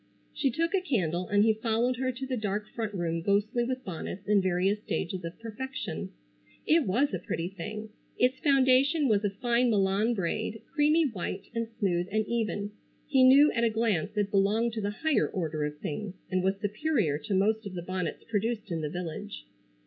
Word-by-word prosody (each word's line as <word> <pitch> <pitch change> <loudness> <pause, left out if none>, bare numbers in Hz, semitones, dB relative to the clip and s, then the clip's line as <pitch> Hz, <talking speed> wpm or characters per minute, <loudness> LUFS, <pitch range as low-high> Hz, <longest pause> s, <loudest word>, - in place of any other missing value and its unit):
She 285 -2 +1
took 330 +7 -1
a 385 - +3
candle 185 - -1
and 205 0 +4
he 220 0 +4
followed 230 +3 0
her 260 0 0
to 260 +2 -6
the 260 -1 -2
dark 210 -2 -2
front 225 -3 -3
room 165 -2 -1
ghostly 205 +6 +1
with 255 +1 -3
bonnets 185 +2 -6
in 205 -1 +4
various 185 +3 +1
stages 180 -3 -3
of 165 +1 -6
perfection. 230 +4 -5 0.6
It 315 -6 +3
was 240 +7 +2
a 185 - -1
pretty 170 0 -3
thing. 210 +4 -6 0.3
Its 255 +1 +2
foundation 275 +2 +4
was 215 -3 +2
of 200 -1 -1
fine 240 +1 +2
Milan 205 +2 +2
braid, 205 +3 -2
creamy 305 +1 +4
white 195 -4 -5
and 230 -1 -1
smooth 180 -3 0
and 215 +1 +1
even. 215 -3 -2 0.3
He 270 -3 +3
knew 275 +3 +7
at 235 - 0
a 230 - +4
glance 215 -3 0
it 205 -1 +1
belonged 210 +4 +2
to 220 - -3
the 200 - -1
higher 300 +8 +1
order 155 -6 -2
of 150 0 -5
things, 190 +6 -5 0.2
and 185 0 +2
was 190 +1 +1
superior 210 - 0
to 175 +6 -2
most 215 +3 +1
of 185 - -8
the 175 - -4
bonnets 185 -2 -3
produced 220 -1 -2
in 165 -1 -1
the 150 - -2
village. 160 - -6
210 Hz, 195 wpm, -29 LUFS, 185-245 Hz, 0.6 s, knew